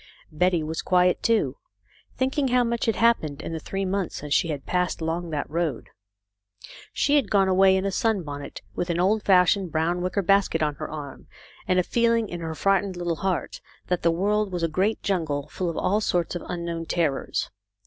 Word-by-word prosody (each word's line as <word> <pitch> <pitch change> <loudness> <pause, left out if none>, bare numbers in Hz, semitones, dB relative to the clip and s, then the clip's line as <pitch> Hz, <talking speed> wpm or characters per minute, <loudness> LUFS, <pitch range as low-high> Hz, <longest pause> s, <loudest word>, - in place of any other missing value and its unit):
Betty 175 +1 +1
was 160 +1 -3
quiet, 180 0 +2
too, 210 - +1 0.6
thinking 265 +2 +1
how 250 0 +3
much 235 0 -1
had 225 - +2
happened 160 -12 +2
in 165 - -5
the 160 - -3
three 195 +5 -3
months 190 -1 -2
since 145 0 -3
she 170 - +3
had 145 -4 -4
passed 180 0 0
along 165 +1 -2
that 150 -2 -3
road. 165 -1 -2 1.0
She 290 +1 +2
had 280 - +1
gone 195 -2 +3
away 190 0 +5
in 190 - -1
a 195 - 0
sunbonnet, 175 -10 -2
with 175 - -3
an 170 0 0
old 205 +4 +2
fashioned 185 -1 +3
brown 165 +3 0
wicker 185 +2 -1
basket 195 -4 +2
on 150 -1 0
her - - -5
arm, 145 -3 -8 0.4
and 185 0 +2
a 180 - +4
feeling 230 +1 +1
in 175 - -5
her 160 -1 -4
frightened 195 +1 +1
little 175 -2 -2
heart 190 -3 -2 0.3
that 180 -1 0
the 170 - +3
world 205 +4 +1
was 175 -2 -3
a - - +3
great 190 +7 0
jungle, 155 -7 -1
full 180 -2 -3
of 165 - -5
all 200 +4 +1
sorts 175 -4 0
of 175 - -4
unknown 170 -1 -4
terrors. 155 -6 -1
180 Hz, 200 wpm, -25 LUFS, 165-200 Hz, 1.0 s, away